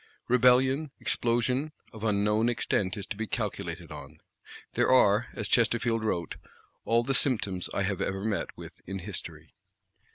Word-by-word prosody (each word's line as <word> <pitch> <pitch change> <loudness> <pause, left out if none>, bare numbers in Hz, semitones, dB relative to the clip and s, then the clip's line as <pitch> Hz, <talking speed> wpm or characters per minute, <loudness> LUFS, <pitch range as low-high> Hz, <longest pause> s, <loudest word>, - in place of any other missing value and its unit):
Rebellion, 130 +4 +4
explosion, 125 +5 0 0.2
of 110 -1 -10
unknown 105 +2 +2
extent 105 -5 -1
is 100 - -5
to - - -5
be 110 +2 -4
calculated - - -4
on. - - -10 0.5
There - - +2
are, 110 -3 +5
as 110 -4 -3
Chesterfield 115 0 +2
wrote, 85 -6 -2 0.5
"all 115 +1 +3
the 135 +3 -1
symptoms 105 -9 0
I 100 - -1
have 95 -1 -1
ever 95 +1 -2
met 105 -5 -2
with - - -11
in 95 +1 -4
History!" 95 +1 -7
110 Hz, 150 wpm, -28 LUFS, 100-125 Hz, 0.5 s, are